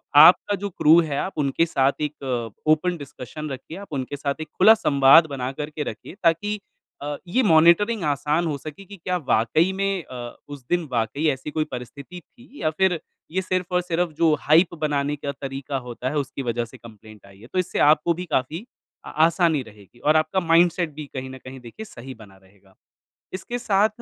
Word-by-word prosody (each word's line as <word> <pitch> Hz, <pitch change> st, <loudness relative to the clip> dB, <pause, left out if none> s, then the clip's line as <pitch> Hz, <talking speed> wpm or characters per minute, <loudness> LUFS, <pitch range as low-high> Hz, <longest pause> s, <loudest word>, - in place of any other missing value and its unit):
आपका 175 Hz, +7 st, +7 dB
जो 200 Hz, +1 st, -5 dB
क्रू 165 Hz, -2 st, +5 dB
है, 150 Hz, -4 st, -3 dB
आप 190 Hz, -, -3 dB
उनके 145 Hz, +3 st, +1 dB
साथ 135 Hz, -4 st, +2 dB
एक 130 Hz, -6 st, -3 dB, 0.2 s
ओपन 170 Hz, +3 st, +2 dB
डिस्कशन 145 Hz, +1 st, -8 dB
रखिए। 135 Hz, +5 st, -8 dB
आप 200 Hz, -5 st, -10 dB
उनके 135 Hz, 0 st, -3 dB
साथ 140 Hz, +2 st, -3 dB
एक 155 Hz, -, -5 dB
खुला 215 Hz, +4 st, +8 dB
संवाद 140 Hz, -4 st, +6 dB
बना 130 Hz, -3 st, -4 dB
करके 150 Hz, +2 st, -5 dB
रखिए -, -, -8 dB
ताकि 205 Hz, +6 st, +1 dB, 0.4 s
अ, 145 Hz, +1 st, -3 dB
ये 250 Hz, +9 st, +1 dB
मॉनिटरिंग 175 Hz, +4 st, +4 dB
आसान 150 Hz, +3 st, 0 dB
हो 150 Hz, -, -2 dB
सके 155 Hz, +8 st, -10 dB
कि 200 Hz, +1 st, -12 dB
क्या 180 Hz, +2 st, -2 dB
वाक़ई 120 Hz, +11 st, +3 dB
में 195 Hz, -2 st, -1 dB
अ, 120 Hz, -3 st, -8 dB
उस 145 Hz, -3 st, -10 dB
दिन 175 Hz, -3 st, 0 dB
वाक़ई 120 Hz, +6 st, 0 dB
ऐसी 135 Hz, +1 st, -4 dB
कोई 155 Hz, -, 0 dB
परिस्थिति 140 Hz, +7 st, -8 dB
थी 245 Hz, -, -17 dB
या 155 Hz, -, +2 dB
फिर 190 Hz, -4 st, +2 dB, 0.3 s
ये 190 Hz, +3 st, 0 dB
सिर्फ़ 185 Hz, -1 st, -2 dB
और 180 Hz, -, +3 dB
सिर्फ़ 175 Hz, -1 st, -1 dB
जो 165 Hz, -2 st, +4 dB
हाइप 165 Hz, +4 st, +4 dB
बनाने 145 Hz, -1 st, 0 dB
का 140 Hz, -1 st, -4 dB
तरीका 135 Hz, 0 st, -5 dB
होता 125 Hz, +2 st, -4 dB
है, 150 Hz, -, -3 dB
उसकी 140 Hz, -1 st, -3 dB
वजह 120 Hz, -1 st, -1 dB
से 115 Hz, -, -14 dB
कम्प्लेन्ट 110 Hz, -2 st, -15 dB
आई 100 Hz, 0 st, -17 dB
है। 115 Hz, -, -14 dB
तो 185 Hz, -, +1 dB
इससे 180 Hz, -, -2 dB
आपको 155 Hz, +3 st, +3 dB
भी 180 Hz, +2 st, -6 dB
काफ़ी 155 Hz, -, -2 dB, 0.4 s
आ -, -, -7 dB, 0.2 s
आसानी 165 Hz, -4 st, +2 dB
रहेगी, 105 Hz, +1 st, -17 dB
और 150 Hz, +4 st, +2 dB
आपका 155 Hz, +4 st, +2 dB
माइंडसेट 170 Hz, 0 st, +3 dB
भी 150 Hz, +1 st, -7 dB
कहीं 130 Hz, 0 st, -5 dB
न 130 Hz, -, -9 dB
कहीं 130 Hz, 0 st, -9 dB
देखिए 125 Hz, -, -10 dB
सही 130 Hz, -, -10 dB
बना 100 Hz, -4 st, -16 dB
रहेगा। 95 Hz, 0 st, -25 dB, 0.6 s
इसके 240 Hz, +6 st, -5 dB
साथ, 210 Hz, -3 st, +2 dB
150 Hz, 195 wpm, -23 LUFS, 130-175 Hz, 0.6 s, खुला